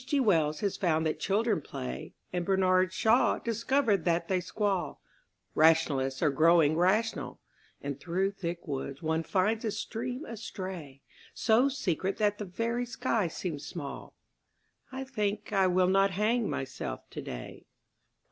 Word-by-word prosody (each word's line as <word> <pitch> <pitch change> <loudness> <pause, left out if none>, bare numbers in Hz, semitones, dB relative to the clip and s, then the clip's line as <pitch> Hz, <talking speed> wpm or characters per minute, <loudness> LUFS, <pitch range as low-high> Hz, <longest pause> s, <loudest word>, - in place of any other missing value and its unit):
G. 275 +3 0
Wells 160 - +2
has 200 -2 -1
found 160 -3 +1
that 155 - -1
children 210 -2 +1
play, 65 - -6 0.2
And 180 -1 0
Bernard 185 0 +3
Shaw 225 +6 +3
discovered 230 - +1
that 170 -1 +1
they 185 -1 +2
squall; 190 -4 -1 0.5
Rationalists 155 -4 +3
are 150 - +4
growing 155 +1 +5
rational 200 +7 +1 0.4
And 140 -1 -4
through 185 +5 0
thick 170 -3 -5
woods 140 +1 -4
one 160 +1 +1
finds 210 +6 0
a 225 - 0
stream 245 +6 -4
astray, 185 - -7 0.3
So 240 +5 +4
secret 195 - -1
that 205 -1 +1
the 210 - -3
very 230 +6 -2
sky 240 -5 0
seems 160 -3 -5
small 145 -5 -7 0.8
I 265 +1 -4
think 210 -5 -2
I 195 -2 +4
will 185 0 +3
not 195 +1 +4
hang 215 +4 +1
myself 130 - -5
today. - - -7
185 Hz, 140 wpm, -30 LUFS, 160-220 Hz, 0.8 s, growing